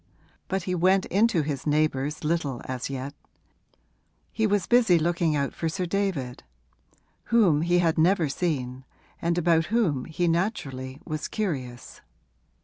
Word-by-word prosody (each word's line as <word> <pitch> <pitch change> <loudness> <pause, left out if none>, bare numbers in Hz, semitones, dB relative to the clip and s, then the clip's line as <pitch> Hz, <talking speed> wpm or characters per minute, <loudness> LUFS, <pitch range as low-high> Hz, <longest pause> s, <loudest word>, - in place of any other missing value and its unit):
But 190 -1 -2
he 180 - -2
went 185 +2 +3
into 205 -5 +2
his 145 -1 -4
neighbours 150 -1 0
little 150 -5 -1
as 130 0 -4
yet: 135 +1 -5 1.2
he 220 -1 +1
was 205 -3 +1
busy 235 -8 +4
looking 170 -1 +1
out 140 -1 -1
for 165 - -2
Sir 180 +3 -2
David, 175 -10 -2 0.8
whom 195 -11 +3
he 175 +2 +2
had 165 -2 +2
never 170 0 +3
seen 135 -5 -2 0.4
and 170 +1 0
about 165 -1 +3
whom 175 - 0
he 170 +2 -1
naturally 145 - -2
was 155 -2 -4
curious. 135 - -4
165 Hz, 140 wpm, -26 LUFS, 140-185 Hz, 1.2 s, busy